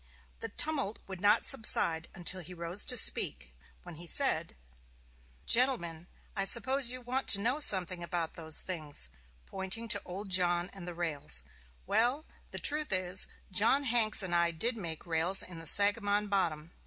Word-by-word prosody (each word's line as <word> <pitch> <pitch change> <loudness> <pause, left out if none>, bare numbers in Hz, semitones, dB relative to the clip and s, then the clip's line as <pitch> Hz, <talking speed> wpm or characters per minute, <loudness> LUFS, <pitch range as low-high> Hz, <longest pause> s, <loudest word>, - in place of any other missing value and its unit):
The 225 - -6
tumult 275 -3 -3
would 190 -2 -10
not 205 0 +1
subside 170 - +3
until 185 0 -4
he 180 +2 -10
rose 170 +4 0
to 250 - +2
speak, - - +1 0.3
when 175 -3 -13
he 170 +1 -7
said: - - +1 0.9
"GENTLEMEN: 175 -10 0 0.3
I 195 - 0
suppose 260 +5 +2
you 255 0 -8
want 255 +2 -4
to 200 - +7
know 245 +8 -2
something 185 - +5
about 170 -1 -6
those 160 -2 0
things 155 - -5 0.4
[pointing 195 +4 -5
to 205 - +2
old 195 +3 -9
John 175 -1 +1
and 180 -3 -11
the 175 - -8
rails]. 145 - -1 0.4
Well, 250 - -2 0.2
the - - -7
truth 300 -2 -1
is, 185 0 +3 0.2
John 225 +9 +2
Hanks 225 -5 0
and 180 -2 -3
I 170 0 +1
did 225 +9 -2
make 170 -7 -8
rails 170 +3 +2
in 175 -2 -11
the 165 - -2
Sagamon 205 +1 +4
Bottom. 170 -5 -3
190 Hz, 165 wpm, -29 LUFS, 170-225 Hz, 0.9 s, to